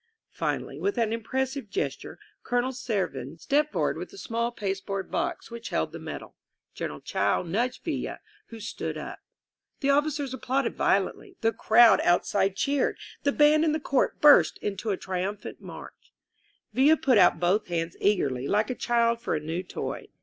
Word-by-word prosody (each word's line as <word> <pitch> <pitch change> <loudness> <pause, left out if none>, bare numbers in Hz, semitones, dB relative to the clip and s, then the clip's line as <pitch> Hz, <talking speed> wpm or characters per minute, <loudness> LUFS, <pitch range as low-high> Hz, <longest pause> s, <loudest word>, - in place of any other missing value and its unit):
Finally, - - -3
with 405 - -1
an 225 -2 +1
impressive 260 +1 -2
gesture, 200 - -3 0.2
Colonel 245 +1 0
Servin 200 - -3
stepped 295 - +1
forward - - 0
with - - -6
the 395 - -14
small 235 -6 -2
pasteboard 195 -2 -4
box 340 -6 -2
which 235 0 -7
held - - -1
the - - -8
medal. - - -8 0.4
General - - -5
Chao - - 0
nudged 225 +9 -2
Villa, - - -3 0.3
who 230 - -10
stood 225 +2 -4
up. - - -7 0.6
The 275 - +3
officers 290 -2 0
applauded 265 +1 -1
violently; 385 -3 0
the 225 0 +2
crowd 220 -3 +6
out 175 0 +3
side 195 -1 +1
cheered; 280 +7 0 0.2
the 285 - +2
band 300 +2 +5
in 315 -2 +2
the 310 - 0
court 280 -3 0
burst 295 -1 +6
into 205 +2 -4
a 195 - 0
tri 185 -1 -3
tunphant 200 +2 -5
march. - - -11 0.6
Villa 280 +7 +5
put 265 -8 +3
put 180 - +5
both 185 +5 +1
hands 170 -1 -2
eagerly, 140 -10 +1
like 210 - +1
a - - 0
child 235 -1 +1
for 235 - -1
a - - 0
new 160 +4 -3
toy. 185 - -5
230 Hz, 170 wpm, -27 LUFS, 195-275 Hz, 0.6 s, crowd